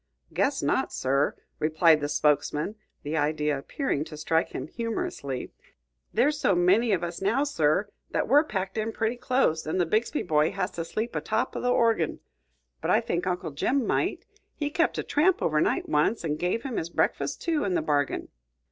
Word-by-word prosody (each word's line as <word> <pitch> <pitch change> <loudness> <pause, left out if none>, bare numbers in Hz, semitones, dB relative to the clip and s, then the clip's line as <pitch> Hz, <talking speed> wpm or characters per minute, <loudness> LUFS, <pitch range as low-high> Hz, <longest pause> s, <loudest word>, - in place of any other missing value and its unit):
"Guess - - +1
not, - - +1
sir," 140 +2 +1 0.2
replied 160 +1 +4
the 145 - -2
spokesman, 150 +4 +1 0.3
the 150 +2 -3
idea 150 -1 +1
appearing 145 - -2
to 155 -1 -9
strike 160 +2 +1
him - - -5
humorously; 210 - -4 0.6
"there's 290 +6 +2
so 195 - +3
many 195 +7 +3
of 180 -3 +1
us 170 +1 -4
now, 220 +8 +2
sir, 180 - +1 0.2
that - - -1
we're 285 +5 +6
packed 195 -6 -3
in 220 +1 -1
pretty 225 +1 -1
close, 245 - +1
an' 155 - -1
the 175 - +3
Bixby 220 - 0
boy 155 -2 +2
has 185 0 -2
to 165 -2 -4
sleep 220 +7 -3
atop 220 +1 -1
o' - - -3
the 250 - 0
orgin. 230 -9 +2 0.6
But - - -2
I - - +5
think 175 +2 -2
Uncle 180 -3 -2
Jim 250 - 0
might; - - -1 0.3
he 295 -1 -2
kept 335 +2 +1
a - - -1
tramp 340 +5 +2
over 155 -1 +1
night - - +1
once, 155 +7 +1
an' 150 -1 -1
give 180 +8 -1
him 260 -4 -4
his 165 - -2
breakfus', - - 0
too, 325 -3 -1
in 190 -3 0
the - - +2
bargain." 145 -2 0
180 Hz, 190 wpm, -27 LUFS, 155-230 Hz, 0.6 s, we're